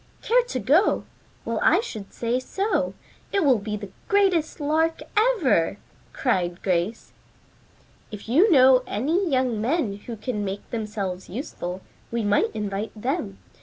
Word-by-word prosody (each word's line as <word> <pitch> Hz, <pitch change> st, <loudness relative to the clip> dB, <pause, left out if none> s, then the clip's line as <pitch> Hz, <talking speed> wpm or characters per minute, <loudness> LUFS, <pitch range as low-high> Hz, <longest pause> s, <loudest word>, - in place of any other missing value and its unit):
"Care -, -, +4 dB
to -, -, -3 dB
go? -, -, +3 dB, 0.4 s
Well -, -, -1 dB
I -, -, +5 dB
should 220 Hz, -, -6 dB
say 235 Hz, +2 st, -1 dB
so. 395 Hz, +11 st, -1 dB, 0.4 s
It 395 Hz, -5 st, +2 dB
will 260 Hz, -5 st, +4 dB
be 210 Hz, +1 st, -4 dB
the 200 Hz, -2 st, -9 dB, 0.2 s
greatest 380 Hz, -7 st, +2 dB
lark 320 Hz, +2 st, +1 dB
ever," 345 Hz, -, +3 dB, 0.3 s
cried 180 Hz, -8 st, -1 dB
Grace. 185 Hz, +4 st, -1 dB, 1.0 s
"If 210 Hz, -1 st, -9 dB
you 335 Hz, -, +4 dB
know 260 Hz, -3 st, +7 dB
any 325 Hz, -, 0 dB
young 255 Hz, -5 st, +1 dB
men 240 Hz, -5 st, 0 dB
who 235 Hz, -2 st, -5 dB
can 215 Hz, -1 st, -3 dB
make 195 Hz, 0 st, -5 dB
themselves 205 Hz, -5 st, -4 dB
useful, 185 Hz, -, -5 dB, 0.3 s
we 230 Hz, -1 st, -1 dB
might 205 Hz, +2 st, +2 dB
invite 210 Hz, +1 st, -4 dB
them. 210 Hz, -, -2 dB
235 Hz, 140 wpm, -24 LUFS, 205-315 Hz, 1.0 s, know